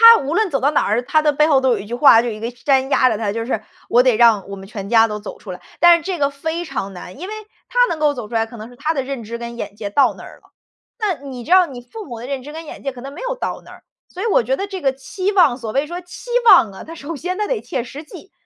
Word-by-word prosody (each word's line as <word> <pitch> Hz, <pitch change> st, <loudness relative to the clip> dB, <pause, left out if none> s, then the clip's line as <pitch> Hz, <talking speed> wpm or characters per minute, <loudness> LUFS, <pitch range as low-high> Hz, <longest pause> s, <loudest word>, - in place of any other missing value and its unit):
他 -, -, 0 dB
无 280 Hz, +4 st, -2 dB
论 420 Hz, +2 st, +2 dB
走 275 Hz, -, 0 dB
到 285 Hz, +3 st, +3 dB
哪 -, -, +2 dB
儿， 215 Hz, +4 st, +1 dB
他 310 Hz, +4 st, +2 dB
的 300 Hz, -1 st, +3 dB
背 300 Hz, +2 st, +3 dB
后 285 Hz, -4 st, +4 dB
都 265 Hz, -, +2 dB
有 225 Hz, -, +1 dB
一 200 Hz, -, -7 dB
句 230 Hz, -, -8 dB
话， 240 Hz, -3 st, +7 dB
就 240 Hz, -, -3 dB
有 225 Hz, -, -4 dB
一 215 Hz, -, -9 dB
个 230 Hz, +2 st, -3 dB
山 265 Hz, +2 st, +1 dB
压 260 Hz, -2 st, +4 dB
着 220 Hz, -, -1 dB
他， 210 Hz, -2 st, -1 dB
就 230 Hz, 0 st, -3 dB
是： 225 Hz, -3 st, -2 dB, 0.3 s
“我 240 Hz, -, +5 dB
得 250 Hz, -2 st, +3 dB
让 220 Hz, -4 st, +4 dB
我 200 Hz, -, -5 dB
们 195 Hz, 0 st, -11 dB
全 200 Hz, -2 st, -7 dB
家 225 Hz, -1 st, +5 dB
都 210 Hz, -1 st, -5 dB
走 205 Hz, -, -8 dB
出 190 Hz, -, -9 dB
来。” 180 Hz, -, -9 dB, 0.2 s
但 345 Hz, 0 st, +8 dB
是 -, -, -9 dB
这 370 Hz, +1 st, -3 dB
个 280 Hz, -2 st, +1 dB
非 320 Hz, +5 st, -4 dB
常 195 Hz, -, -4 dB
难， 180 Hz, +6 st, -10 dB
因 365 Hz, -, -6 dB
为 425 Hz, -, -6 dB, 0.4 s
他 -, -, -1 dB
能 320 Hz, -, -3 dB
够 295 Hz, -1 st, +3 dB
走 240 Hz, -5 st, -7 dB
出 235 Hz, -, -11 dB
来， 225 Hz, -, +2 dB
可 230 Hz, +1 st, -13 dB
能 220 Hz, +2 st, -9 dB
是 245 Hz, -, -15 dB
他 310 Hz, +2 st, -1 dB
的 275 Hz, -4 st, -2 dB
认 265 Hz, -2 st, -5 dB
知 230 Hz, +2 st, -6 dB
跟 235 Hz, 0 st, -7 dB
眼 205 Hz, -3 st, -6 dB
界 205 Hz, -1 st, -5 dB
到 275 Hz, +7 st, +3 dB
那 -, -, -12 dB
儿 -, -, -13 dB
了。 -, -, -24 dB, 0.5 s
那 415 Hz, -5 st, 0 dB
你 250 Hz, -2 st, -7 dB
知 320 Hz, -, -8 dB
道 370 Hz, 0 st, +7 dB
你 255 Hz, -4 st, -9 dB
父 425 Hz, -, -10 dB
母 235 Hz, -4 st, -8 dB
的 245 Hz, -, -7 dB
认 275 Hz, -2 st, -3 dB
知 295 Hz, +3 st, -9 dB
跟 325 Hz, +1 st, -8 dB
眼 -, -, -10 dB
界 275 Hz, -, -3 dB
可 250 Hz, -, -11 dB
能 275 Hz, +2 st, -8 dB
没 -, -, -10 dB
有 -, -, -2 dB
到 -, -, -4 dB
那 -, -, -13 dB
儿， -, -, -15 dB, 0.2 s
所 370 Hz, -, -7 dB
以 -, -, -2 dB
我 435 Hz, -, +3 dB
觉 260 Hz, +4 st, 0 dB
得 395 Hz, -, -3 dB
这 385 Hz, -1 st, -6 dB
个 270 Hz, -2 st, +1 dB
期 370 Hz, +9 st, -3 dB
望 320 Hz, -11 st, +4 dB
所 230 Hz, -4 st, -5 dB
谓 275 Hz, +2 st, +1 dB
说 345 Hz, +3 st, -6 dB
期 360 Hz, +7 st, -12 dB, 0.2 s
望 225 Hz, -6 st, +7 dB
啊， 190 Hz, -, -10 dB
它 330 Hz, -, -9 dB
首 325 Hz, +1 st, -6 dB
先 360 Hz, +6 st, -4 dB
它 420 Hz, -, 0 dB
得 -, -, -1 dB
切 245 Hz, -, -3 dB
实 280 Hz, +5 st, -9 dB
际， 360 Hz, +4 st, -13 dB
270 Hz, 355 characters per minute, -19 LUFS, 230-325 Hz, 0.5 s, 但